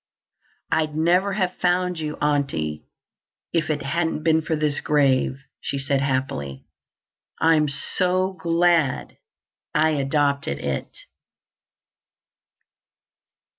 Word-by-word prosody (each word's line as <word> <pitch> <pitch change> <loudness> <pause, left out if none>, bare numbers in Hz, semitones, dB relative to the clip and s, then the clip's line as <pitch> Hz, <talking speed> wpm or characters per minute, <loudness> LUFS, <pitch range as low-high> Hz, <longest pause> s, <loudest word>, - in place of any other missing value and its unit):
"I'd 155 -1 +1
never 180 +5 +2
have 185 -2 0
found 180 -1 +1
you, 150 -1 -4
Aunty, 135 - -1 0.7
if 165 -2 +1
it 150 -2 -1
hadn't 160 +2 -1
been 160 -1 +3
for 160 0 -1
this 150 -1 0
grave," 135 -3 +2 0.2
she 140 - -3
said 135 0 0
happily. 130 - -2 0.7
"I'm 160 -2 +4
so 185 +6 0
glad 165 -4 +1 0.6
I 155 +1 +4
adopted 140 - 0
it." - - -3
155 Hz, 95 wpm, -23 LUFS, 140-170 Hz, 0.7 s, I'm